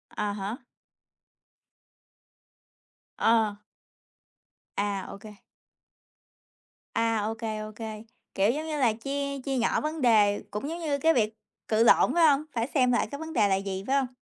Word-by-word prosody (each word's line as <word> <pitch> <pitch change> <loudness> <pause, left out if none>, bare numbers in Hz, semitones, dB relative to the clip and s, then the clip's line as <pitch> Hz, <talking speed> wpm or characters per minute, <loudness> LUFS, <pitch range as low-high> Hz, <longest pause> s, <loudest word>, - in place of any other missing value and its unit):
À 205 -1 -1
há. 205 +4 -4 2.6
Ờ. 225 -2 +3 1.2
À, 200 -2 -2
ô 200 - -9
kê. 210 -2 -12 1.6
À, 230 -1 +1
ô 220 - -2
kê, 220 -2 -4
ô 215 0 -6
kê. 220 -1 -7 0.3
Kiểu 200 +4 +3
giống 310 +4 -4
như 305 - -2
là, 235 -5 +3
chia 280 +4 -3
chia 270 0 -2
nhỏ 235 - +1
vấn 305 0 -3
đề, 210 -4 +4
cũng 210 +8 -4
giống 335 +2 -5
như 300 -4 -1
cái 320 +4 +3
việc 220 -4 +1 0.3
cự 220 +1 +3
lộn, 230 - +5
phải 335 -2 +5
hông? 285 0 +3
Phải 230 +1 -1
xem 255 -4 +2
lại 240 - +1
cái 280 - -6
vấn 320 0 -6
đề 215 -7 +3
là 195 - +2
gì? 195 0 -4
Phải 270 - +2
hông? 270 -2 +2
230 Hz, 165 wpm, -27 LUFS, 210-280 Hz, 2.6 s, lộn